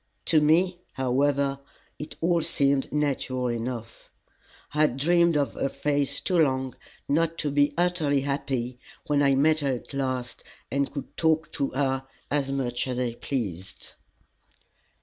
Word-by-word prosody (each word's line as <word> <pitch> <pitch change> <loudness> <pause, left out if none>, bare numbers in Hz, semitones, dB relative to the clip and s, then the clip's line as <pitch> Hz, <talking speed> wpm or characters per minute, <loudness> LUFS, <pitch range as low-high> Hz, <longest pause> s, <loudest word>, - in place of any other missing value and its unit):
To 155 -2 +4
me, 175 +4 +3
however, 135 +2 +1 0.4
it 150 - -7
all 170 0 +3
seemed 140 -2 +1
natural 135 -4 0
enough. 115 -1 -5 0.6
I 150 - +1
had 150 -4 +3
dreamed 170 +2 +4
of 140 -1 0
her 135 - -1
face 145 -1 0
too 180 -3 +1
long 130 -4 +1 0.3
not 165 +3 +1
to 150 - -1
be 145 +1 +2
utterly 170 -6 +2
happy 135 -3 -2 0.3
when 145 -3 +2
I 140 -1 +4
met 155 +3 +4
her 140 -3 0
at 125 - -7
last 130 -3 -3 0.3
and 140 0 0
could 140 -1 -7
talk 160 -1 +2
to 140 -3 -1
her 135 -1 0 0.2
as 140 -2 +1
much 125 -2 -1
as 125 -1 -2
I 120 -2 -1
pleased. 100 - -4
140 Hz, 150 wpm, -26 LUFS, 130-150 Hz, 0.6 s, To